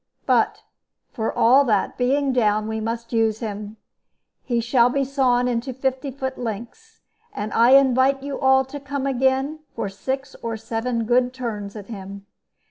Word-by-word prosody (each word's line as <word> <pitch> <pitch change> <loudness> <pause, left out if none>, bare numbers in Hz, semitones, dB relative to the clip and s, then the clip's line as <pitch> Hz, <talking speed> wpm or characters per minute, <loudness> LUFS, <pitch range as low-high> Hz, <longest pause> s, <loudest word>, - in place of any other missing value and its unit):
But, - - +2 0.5
for 225 -3 -2
all 260 +5 +5
that, 210 -5 +1
being 270 +2 +1
down, 215 -3 +2
we 220 0 -3
must 230 +2 -4
use 225 -2 +2
him. 210 -1 -6 0.7
He 240 -3 0
shall 235 +1 +3
be 275 +2 0
sawn 255 -2 +1
into 245 +2 -2
fifty 265 +1 -2
foot 265 0 -5
lengths. 240 - -7 0.3
And 210 +1 -4
I 235 +3 +5
invite 270 0 +4
you 280 -1 -4
all 265 0 +4
to 285 +2 -8
come 280 0 -4
again, 265 +3 +1 0.2
for 225 -3 -3
six 265 +7 -4
or 230 -1 -3
seven 230 +1 -2
good 250 +2 +2
turns 215 -5 -5
at 205 -2 -8
him." 200 -2 -9
245 Hz, 160 wpm, -22 LUFS, 225-265 Hz, 0.7 s, all